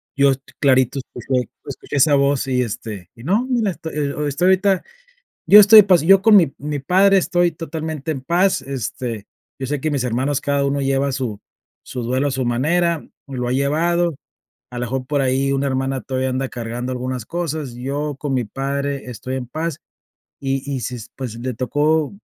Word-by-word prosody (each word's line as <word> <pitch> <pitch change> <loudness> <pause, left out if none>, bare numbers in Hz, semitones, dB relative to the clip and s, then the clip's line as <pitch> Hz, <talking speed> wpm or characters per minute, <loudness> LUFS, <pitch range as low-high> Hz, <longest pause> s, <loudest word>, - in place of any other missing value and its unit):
Yo 140 0 +4
est 135 0 -3 0.2
clarito 130 -1 +3
escuche 125 0 -2 0.2
escuché - - -7
esa 145 +1 +5
voz, 140 -1 +1
y, 125 -1 +1
este, 105 -4 -5
y 115 - -13
no, 205 - +1
mira, 230 -5 +1
estoy 150 -3 -4 0.4
ahorita, 190 0 +3 0.6
yo 210 - +9
estoy 210 +1 +10
en 205 - +1
paz. 180 -5 +5
Yo 195 +4 +6
con 215 0 +7
mi 165 -8 +4
mi 145 +1 -3
padre 195 +7 +4
estoy 175 -1 +1
totalmente 160 -2 -5
en 135 - -5
paz, 170 +2 +1
este, 125 -4 -5 0.3
yo 135 - -4
sé 145 +1 -2
que 155 - -1
mis 140 -3 -1
hermanos 130 +4 0
cada 140 -1 0
uno 140 0 0
lleva 135 0 0
su 120 -6 -3 0.4
su 125 - -6
duelo 130 +4 0
a - - -2
su 130 -1 -2
manera, 160 +7 0 0.2
lo 125 -3 -4
ha - - 0
llevado. 165 +5 +1 0.6
A 125 - -7
lo - - -3
mejor, 130 +2 -3
por 145 0 0
ahí, 135 +1 +1
una 135 0 0
hermana 135 0 -1
todavía 130 0 -2
anda 130 +1 -1
cargando 120 +2 -5
algunas 125 -2 -4
cosas, 155 -5 -4
yo 140 +4 -3
con 145 -1 -3
mi 125 -2 0
padre 140 +3 -3
estoy 125 +2 -5
en 125 -2 -5
paz. 155 +3 -4 0.6
Y-y 135 0 -2
si, 125 +1 -4 0.2
pues, 125 -4 -6
le 125 +1 -3
tocó, 145 - 0
140 Hz, 185 wpm, -20 LUFS, 130-155 Hz, 0.6 s, estoy